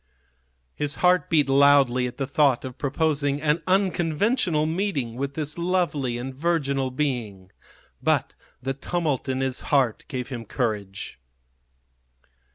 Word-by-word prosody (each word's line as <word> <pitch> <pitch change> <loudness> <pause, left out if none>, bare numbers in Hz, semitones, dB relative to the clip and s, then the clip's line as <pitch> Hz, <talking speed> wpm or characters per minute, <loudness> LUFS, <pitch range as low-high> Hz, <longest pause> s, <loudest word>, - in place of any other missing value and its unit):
His 145 0 -2
heart 180 -3 +3
beat 150 -4 +3
loudly 135 -2 +4
at 120 - -9
the 135 - -1
thought 140 -2 +2
of 130 -1 -8
proposing 145 -1 0
an 150 +2 +1
unconventional 185 - +1
meeting 160 - -1
with 140 +2 -4
this 155 +1 -3
lovely 170 -9 0
and 130 +2 -5
virginal 140 -3 0
being. 120 -9 -3 0.5
But - - +1 0.3
the 135 +1 -1
tumult 145 -2 -2
in 130 0 -1
his 130 -1 -1
heart 130 -6 +2
gave 125 -2 -5
him 120 -4 -5
courage. 105 - -4
140 Hz, 130 wpm, -25 LUFS, 130-160 Hz, 0.5 s, loudly